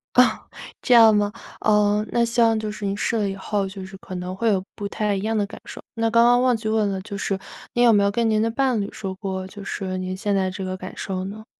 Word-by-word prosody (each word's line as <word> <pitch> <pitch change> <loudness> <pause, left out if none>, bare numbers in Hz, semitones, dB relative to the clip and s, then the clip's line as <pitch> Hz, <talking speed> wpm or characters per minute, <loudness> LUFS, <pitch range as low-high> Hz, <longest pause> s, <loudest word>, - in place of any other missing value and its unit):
哦， 250 - +9 0.6
这 250 - +2
样 225 -2 +8
吗？ 205 0 +1 0.3
呃， 210 0 +3
那 235 0 +2
希 235 +1 +1
望 225 -1 +4
就 215 -1 -3
是 210 -1 -6
您 195 0 -1
试 230 - -1
了 205 -2 0
以 195 - -4
后， 200 +1 -2
就 190 0 -8
是 190 +1 -11
可 185 - -9
能 180 +1 -5
会 230 +3 +1
有 190 -3 +2
不 205 - -6
太 210 0 -1
一 195 - -3
样 220 +1 -1
的 205 - +1
感 - - -11
受。 - - -9
那 225 0 0
刚 230 +1 +5
刚 245 +1 +5
忘 255 -1 +3
记 220 - -5
问 215 -1 +1
了 190 - -3
就 200 0 -7
是 195 -1 -2 0.3
您 240 0 +4
有 230 - +6
没 205 -1 +4
有 200 - +2
跟 230 +1 +1
您 215 -1 +2
的 225 +1 +1
伴 255 -2 +1
侣 200 - -4
说 195 -3 -6
过， 190 -1 -4
就 200 +1 -10
是 190 -2 -4
您 185 0 -3
现 205 +1 -1
在 190 -1 0
这 190 0 -5
个 185 0 -3
感 185 0 -8
受 185 -1 -3
呢？ 215 +3 -8
205 Hz, 300 characters per minute, -23 LUFS, 195-225 Hz, 0.6 s, 哦